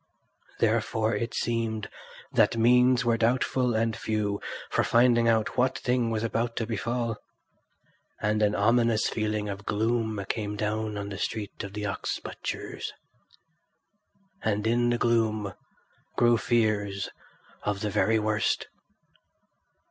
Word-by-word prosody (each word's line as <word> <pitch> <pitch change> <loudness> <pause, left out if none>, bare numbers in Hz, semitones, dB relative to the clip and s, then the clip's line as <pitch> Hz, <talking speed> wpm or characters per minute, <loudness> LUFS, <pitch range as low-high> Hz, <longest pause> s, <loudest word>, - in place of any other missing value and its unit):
Therefore 110 +1 +1
it 115 -1 -3
seemed 115 -2 -1 0.4
that - - +3
means 125 +2 +4
were 115 -1 +3
doubtful 125 +1 +1
and 110 0 +1
few 105 -2 -1 0.3
for - - +2
finding 120 0 +4
out 110 0 +1
what 130 +1 +2
thing 125 -2 0
was 110 -1 -1
about 115 +1 -1
to 115 - -1
befall; 115 0 -2 1.0
and 105 +1 0
an 105 0 +3
ominous 115 +1 +3
feeling 105 -1 -1
of 100 0 -5
gloom 110 -1 0
came 105 -2 -2
down 105 0 -2
on 100 0 -4
the 95 -1 -6
street 105 -1 -4
of 100 -1 -7
the 105 0 -4
ox 100 -1 -2
butchers. - - -5 1.5
And 105 0 0
in 120 +1 +2
the 120 - +2
gloom 110 -4 +1 0.6
grew 120 -1 +4
fears 105 -5 0 0.5
of 105 -1 -2
the 105 - -1
very 110 +2 +3
worst. 110 0 0
110 Hz, 130 wpm, -27 LUFS, 105-120 Hz, 1.5 s, means